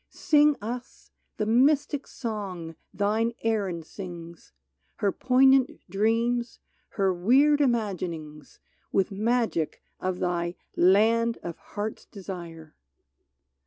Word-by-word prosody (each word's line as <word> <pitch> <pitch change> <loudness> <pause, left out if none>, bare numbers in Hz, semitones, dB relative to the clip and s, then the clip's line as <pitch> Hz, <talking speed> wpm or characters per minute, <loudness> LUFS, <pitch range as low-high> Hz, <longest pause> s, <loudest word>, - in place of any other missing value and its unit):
Sing 300 -3 +3
us 245 +3 -7 0.3
the 215 - 0
mystic 280 +5 +2
song 195 -8 -5 0.2
thine 215 +4 0
Erin 200 -7 -1
sings, 170 -1 -10 0.4
Her 200 - 0
poignant 265 +2 +3
dreams, 230 +4 0 0.4
her 195 -2 +2
weird 270 +11 +4
imaginings. 175 - -2 0.3
With 195 +1 +1
magic 220 -5 -1 0.2
of 185 -1 -2
thy 175 -1 -1
" - - -37
Land 225 +5 +4
of 170 -1 -6
Heart's 210 +1 -6
Desire 170 -5 -9
210 Hz, 100 wpm, -27 LUFS, 180-240 Hz, 0.4 s, weird